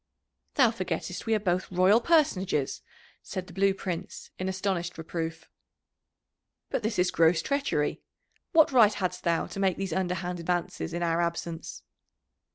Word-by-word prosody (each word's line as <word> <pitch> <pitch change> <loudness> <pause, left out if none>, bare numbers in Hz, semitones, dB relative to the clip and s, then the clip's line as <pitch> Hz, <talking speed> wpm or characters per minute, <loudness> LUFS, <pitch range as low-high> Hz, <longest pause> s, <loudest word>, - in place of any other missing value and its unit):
"Thou 250 -5 +5
forgettest 185 -2 -4
we 225 - +3
are - - +1
both 185 -2 -1
royal 185 +5 +5
personages," 195 - +1 0.4
said 185 - -5
the 180 - -13
Blue 195 +2 +3
Prince 185 -2 -5
in 185 +1 -1
astonished 185 -2 -2
reproof. 165 0 -5 1.2
"But - - 0
this 220 +1 -2
is 180 0 +2
gross 165 0 +3
treachery 280 - 0 0.5
what 315 -3 +5
right 220 -5 +6
hadst 180 -2 -2
thou 170 -2 +1
to - - -7
make 190 -2 +2
these 195 -3 -3
underhand 180 -1 -2
advances 170 -1 -2
in 175 - -2
our 170 0 +1
absence?" 170 -1 -4
185 Hz, 150 wpm, -28 LUFS, 170-195 Hz, 1.2 s, right